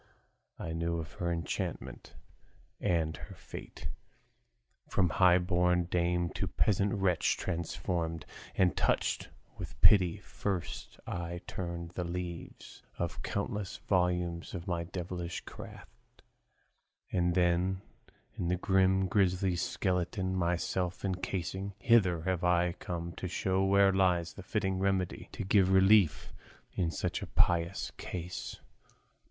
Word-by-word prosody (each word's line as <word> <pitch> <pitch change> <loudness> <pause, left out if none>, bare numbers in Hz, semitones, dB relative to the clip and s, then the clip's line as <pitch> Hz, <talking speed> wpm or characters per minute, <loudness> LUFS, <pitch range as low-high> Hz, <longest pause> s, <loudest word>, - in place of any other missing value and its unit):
I 80 - -4
knew 85 +1 -1
of 80 -2 -5
her 85 -1 0
enchantment 85 -2 -4 0.6
and 80 -2 +1
her - - -10
fate, - - -8 1.0
From 90 -2 +2
high 90 +3 +5
born 90 0 +2
dame 85 0 +1
to - - -2
peasant 100 -1 +2
wench 95 -4 +2
transformed 85 -1 -2 0.3
And 90 -4 +3
touched - - +1 0.3
with - - -7
pity, 90 -5 +6
first 95 -4 -4
I 85 0 -4
turned 85 -2 -5
the 90 - -3
leaves 85 0 -6 0.2
Of 85 +1 -3
countless 100 0 -3
volumes 90 -2 0
of 85 -1 -6
my 85 -2 -1
devilish 90 0 -4
craft, - - -12 0.9
And 90 -1 +2
then, 90 +1 +2 0.5
in 85 - -3
this 90 +1 +1
grim 95 0 +3
grisly 95 -1 +2
skeleton 95 +1 -1
Myself 90 +2 -1
encasing, 95 +1 -3
hither 95 -7 +4
have 90 -1 -1
I 90 0 +3
come 85 -2 -5
To 95 - -3
show 95 +2 0
where 100 0 +5
lies 90 -3 +2
the - - -9
fitting 95 -1 -1
remedy 95 -2 0
To - - -4
give 95 0 +4
relief 95 -3 +5 0.4
in 85 -3 0
such - - -2
a - - -5
piteous 85 +1 +1
case. 90 0 -5
90 Hz, 125 wpm, -32 LUFS, 85-95 Hz, 1.0 s, pity